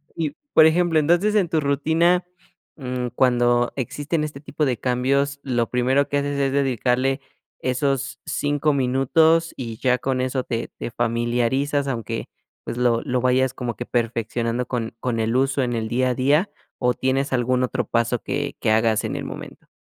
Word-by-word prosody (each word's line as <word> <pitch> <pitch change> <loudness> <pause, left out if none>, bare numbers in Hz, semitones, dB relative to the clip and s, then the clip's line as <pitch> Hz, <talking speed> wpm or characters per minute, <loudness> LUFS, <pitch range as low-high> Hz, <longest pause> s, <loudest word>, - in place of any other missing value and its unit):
Y, 155 -3 -2 0.2
por 155 - +8
ejemplo, 165 0 +3
entonces 175 +7 +2
en 195 -5 +2
tu 160 - +1
rutina, 160 +5 +2 0.5
mm, 125 -3 -3
cuando, 120 -1 +2
existen 145 +5 -2
este 150 -2 -5
tipo 150 0 -2
de 125 -4 0
cambios, 140 +4 0
¿lo 120 -4 0
primero 130 +3 +2
que 145 - 0
haces 140 0 -1
es 135 -1 +1
dedicarle, 135 0 +1 0.4
esos, 135 +1 -1
5 145 +1 0
minutos 150 +6 +3
y 115 -4 -5
ya 125 +1 +2
con 130 0 -1
eso 130 0 -1
te 115 -2 -3
te - - -5
familiarizas, 120 +5 0
aunque, 115 -3 -3 0.4
pues, - - -5
lo 120 -2 +2
lo 125 0 -1
vayas 130 +1 +2
como 120 -3 -4
que 120 - -6
perfeccionando 115 0 -1
con 115 -3 -3
con 120 -2 -2
el 115 +1 0
uso 135 +1 +2
en 120 -1 -1
el 115 -1 -2
día 125 +3 +1
a 125 - 0
día? 145 - +2 0.3
¿O 125 -1 +1
tienes 130 +3 -1
algún 125 0 +1
otro 125 -1 -1
paso 115 +1 +1
que 145 +1 -3
que 110 - +1
hagas 110 -1 +2
en - - -3
el - - -4
momento? - - -9
130 Hz, 175 wpm, -22 LUFS, 120-140 Hz, 0.5 s, por